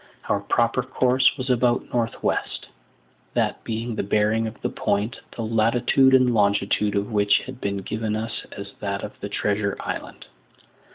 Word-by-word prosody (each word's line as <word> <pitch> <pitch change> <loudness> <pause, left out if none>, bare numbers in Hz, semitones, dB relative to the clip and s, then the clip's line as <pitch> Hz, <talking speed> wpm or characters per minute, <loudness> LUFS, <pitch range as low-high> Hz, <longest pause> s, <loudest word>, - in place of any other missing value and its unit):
Our 100 - +2
proper 115 +4 +1
course 130 +2 +2
was 130 -1 -1
about 120 -1 +1
north 115 -2 -1
west, - - -1 0.7
that - - 0
being 115 +1 -3
the - - -1
bearing 105 +2 +1
of 110 - -8
the - - +1
point, 105 +5 -1 0.2
the 115 - -3
latitude 120 +4 +3
and 130 -2 +4
longitude 105 0 +2
of 100 +2 -1
which 105 -1 +3
had 130 -1 -9
been 100 0 -1
given 110 +2 -3
us 110 0 -4
as 100 0 -8
that 100 -1 -3
of 105 - -5
the 100 - -5
treasure 100 0 -1
island. - - -6
110 Hz, 165 wpm, -24 LUFS, 100-120 Hz, 0.7 s, and